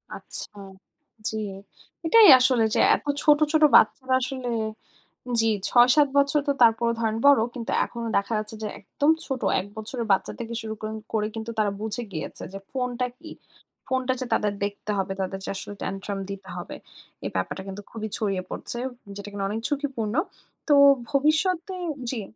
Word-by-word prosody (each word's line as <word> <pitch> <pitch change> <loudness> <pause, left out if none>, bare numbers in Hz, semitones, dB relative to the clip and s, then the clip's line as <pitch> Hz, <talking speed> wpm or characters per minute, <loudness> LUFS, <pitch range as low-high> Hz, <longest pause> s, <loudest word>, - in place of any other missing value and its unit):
আচ্ছা, - - -2 0.7
জি। - - -5 0.7
এটাই 440 +5 +7
আসলে 255 -2 +3
যে - - +2 0.2
এত - - -9 0.2
ছোট, 295 -1 +5
ছোট 315 0 +4
বাচ্চারা 260 +4 +4
আসলে 255 -1 -3 0.9
জি 225 - +2 0.2
৬-৭ 255 +4 +5
বছর 280 +1 +4
তো - - +4
তারপরও 230 0 +4
ধরেন 225 -1 -1
বড়। 285 -1 +7 0.2
কিন্তু 235 -3 -5
এখনো 235 -1 -7
দেখা 200 +3 0
যাচ্ছে 215 +1 -3
যে 215 - -2
একদম 285 +9 0 0.2
ছোট। 265 -3 -3 0.2
১ 190 - -7
বছরের 225 +2 -4
বাচ্চা 190 - +1
থেকে 235 0 -5
শুরু 220 -1 -5
করেন 215 0 -5 0.2
করে 210 -1 0
কিন্তু 225 0 -5
তারা 210 -1 +2
বুঝে 220 +2 -2
গিয়েছে 155 -4 -5
যে 195 - -6
ফোনটা 250 -1 -2
কি। 320 +1 -11 0.6
ফোনটা 260 0 0
যে 255 - -3
তাদের 210 -1 0
দেখতে 205 +1 -5
হবে, 195 0 -2
তাদেরকে 195 0 -4
আসলে 205 - -6
tantrum 195 +1 -4
দিতে 195 -1 -8
হবে। 175 - -7 0.5
এই - - -2
ব্যাপারটা 95 - -3
কিন্তু 195 +1 -7
খুবই 220 -1 -5
ছড়িয়ে 195 -4 -1
পড়ছে। 240 - +3 0.4
যেটা 205 0 -7
কিন্তু 200 -1 -4
অনেক 215 +3 -3
ঝুঁকিপূর্ণ। 270 -7 -3 0.5
তো 295 - +5 0.4
ভবিষ্যতে 320 +6 +1 0.4
জি। 250 - -3
230 Hz, 165 wpm, -25 LUFS, 205-265 Hz, 0.9 s, এটাই